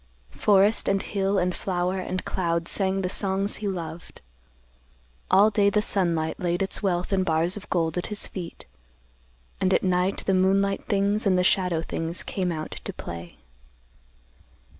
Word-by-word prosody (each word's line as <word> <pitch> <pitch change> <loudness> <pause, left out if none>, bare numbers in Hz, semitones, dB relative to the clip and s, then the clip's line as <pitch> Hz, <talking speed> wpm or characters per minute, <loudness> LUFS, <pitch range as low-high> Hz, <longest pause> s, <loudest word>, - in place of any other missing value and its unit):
Forest 205 +1 +3
and 195 0 +2
hill 195 0 -1
and 180 -1 +1
flower 185 0 -1
and 185 0 -3
cloud 170 -2 -1
sang 195 -1 0
the - - +1
songs 195 +1 -1
he 210 - -4
loved. 170 -3 -6 1.1
All 210 +3 +6
day 200 -1 +4
the 210 - +2
sunlight 170 -6 0
laid 175 +1 0
its 195 - -2
wealth 180 -1 0
in 190 -1 +3
bars 165 +1 +1
of 205 - -9
gold 165 -1 0
at - - -3
his 210 -1 -3
feet, 175 -3 -7 0.9
and 185 - +2
at - - +1
night 185 +1 +1
the 195 - +2
moonlight 195 +1 +2
things 205 +1 +1
and 185 -2 +4
the 180 - +3
shadow 180 -3 +2
things 165 +1 -4
came 185 -2 -2
out 155 -1 -5
to - - -4
play. 85 0 -8
185 Hz, 160 wpm, -25 LUFS, 175-195 Hz, 1.1 s, All